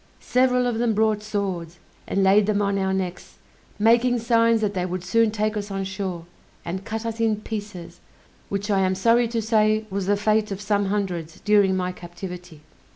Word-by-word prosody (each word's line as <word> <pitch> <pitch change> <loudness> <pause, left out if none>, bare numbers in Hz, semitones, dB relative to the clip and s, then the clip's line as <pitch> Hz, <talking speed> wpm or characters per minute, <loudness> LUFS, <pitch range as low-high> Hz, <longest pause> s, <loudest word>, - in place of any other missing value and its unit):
Several 250 0 +2
of 240 -2 -1
them 235 -2 +1
brought 215 -1 +2
swords, 190 -5 -4 0.3
and 195 - +1
laid 200 +2 +4
them 210 -1 +1
on 200 -1 0
our 190 0 0
necks, 185 -2 -4 0.4
making 235 +3 +3
signs 230 0 +3
that 205 -2 0
they 185 -2 -1
would 180 0 -4
soon 225 +5 +3
take 215 0 -1
us 205 -1 -4
on 195 -1 -3
shore, 190 -3 -4 0.4
and 185 +3 -4
cut 225 +1 -5
us 230 0 -4
in 225 -1 +2
pieces, 205 -6 -7 0.5
which 200 +1 -2
I 195 - +3
am 190 0 +1
sorry 230 +5 +3
to 230 -1 -2
say 215 0 +2
was 195 -1 -2
the 205 0 +2
fate 215 +1 +1
of 195 -1 -4
some 205 0 0
hundreds 185 -5 -3
during 205 -3 +3
my 180 0 -1
captivity. 175 -2 -9
205 Hz, 190 wpm, -23 LUFS, 190-220 Hz, 0.5 s, laid